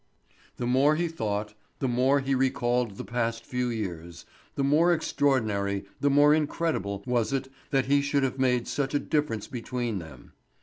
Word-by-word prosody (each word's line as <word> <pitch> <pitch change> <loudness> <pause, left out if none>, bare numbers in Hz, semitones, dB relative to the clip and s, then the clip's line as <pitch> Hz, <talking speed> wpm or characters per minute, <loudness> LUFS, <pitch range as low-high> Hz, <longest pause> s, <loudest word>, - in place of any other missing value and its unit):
The 125 - -3
more 135 +5 +4
he 170 +2 0
thought, 105 -9 -3 0.2
the 135 - -1
more 130 +3 +2
he 135 0 -1
recalled 125 -4 +1
the - - -6
past 115 +1 -2
few 125 -1 -2
years, 85 -7 -5 0.3
the 140 - 0
more 155 +5 +4
extraordinary, 110 - 0
the 145 - +2
more 145 +1 +6
incredible 150 - -1
was 120 -1 0
it 135 -1 -2 0.2
that 135 -2 +2
he 140 +2 +3
should 140 0 +1
have 130 0 -1
made 125 -2 +2
such 140 0 -2
a - - +3
difference 145 -10 -1
between 120 -4 -3
them. 75 -7 -12
125 Hz, 170 wpm, -27 LUFS, 110-140 Hz, 0.3 s, more